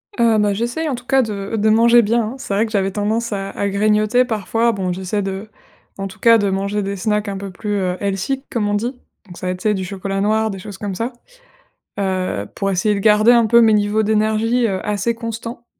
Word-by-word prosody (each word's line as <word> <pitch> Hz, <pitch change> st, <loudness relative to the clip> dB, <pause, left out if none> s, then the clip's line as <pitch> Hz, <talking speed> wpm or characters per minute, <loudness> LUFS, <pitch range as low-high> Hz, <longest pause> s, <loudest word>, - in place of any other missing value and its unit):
Heu 230 Hz, -2 st, +3 dB
bah, 205 Hz, -1 st, +2 dB
j'essaie, 240 Hz, +10 st, -2 dB
en 270 Hz, -, -1 dB
tout 240 Hz, +1 st, -11 dB
cas, 270 Hz, +1 st, +3 dB
de 205 Hz, -2 st, -4 dB
de 215 Hz, +1 st, +2 dB
manger 235 Hz, +2 st, +6 dB
bien, 230 Hz, +2 st, +1 dB
hein. -, -, -9 dB
C'est 260 Hz, -6 st, -5 dB
vrai 205 Hz, +3 st, +2 dB
que 220 Hz, -, -8 dB
j'avais 195 Hz, -2 st, 0 dB
tendance 215 Hz, +3 st, -1 dB
à 195 Hz, -1 st, -3 dB
à 200 Hz, -, -2 dB
grignoter, 215 Hz, +4 st, +2 dB
parfois. 225 Hz, +1 st, 0 dB
Bon, 190 Hz, -4 st, -2 dB
j'essaie 190 Hz, +3 st, -2 dB
de 195 Hz, +2 st, -5 dB, 0.5 s
en 195 Hz, 0 st, -3 dB
tout 190 Hz, -, -13 dB
cas, 230 Hz, -1 st, +6 dB
de 205 Hz, -2 st, 0 dB
manger 200 Hz, +2 st, -1 dB
des 200 Hz, +1 st, -3 dB
snacks 210 Hz, +2 st, -1 dB
un 200 Hz, -1 st, -3 dB
peu 195 Hz, 0 st, -6 dB
plus, 205 Hz, +3 st, -5 dB
heu, 185 Hz, -2 st, -1 dB
healthy, 200 Hz, +7 st, -2 dB
comme 220 Hz, -4 st, 0 dB
on 205 Hz, -, 0 dB
dit. 235 Hz, +4 st, -1 dB, 0.3 s
Donc, 175 Hz, -3 st, -12 dB
ça 185 Hz, -, -5 dB
va -, -, 0 dB
être, 180 Hz, -, -5 dB
tu -, -, -11 dB
sais, 215 Hz, -1 st, +2 dB
du 190 Hz, -2 st, -3 dB
chocolat 195 Hz, +1 st, -3 dB
noir, 220 Hz, +1 st, +1 dB
des 195 Hz, -, -7 dB
choses 200 Hz, 0 st, -9 dB
comme 195 Hz, -1 st, -4 dB
ça. 235 Hz, +6 st, -3 dB, 0.9 s
Heu, 185 Hz, -, -1 dB
pour 195 Hz, 0 st, -1 dB
essayer 200 Hz, +3 st, +1 dB
de -, -, -2 dB
garder 215 Hz, +2 st, +5 dB
un 235 Hz, -1 st, +5 dB
peu 235 Hz, +2 st, +5 dB
mes 225 Hz, -1 st, +5 dB
niveaux 210 Hz, +1 st, +2 dB
d'énergie, 220 Hz, +3 st, +1 dB
heu, 190 Hz, -3 st, -2 dB
assez 210 Hz, +2 st, 0 dB
constants. 230 Hz, +1 st, -6 dB
210 Hz, 245 wpm, -19 LUFS, 195-230 Hz, 0.9 s, manger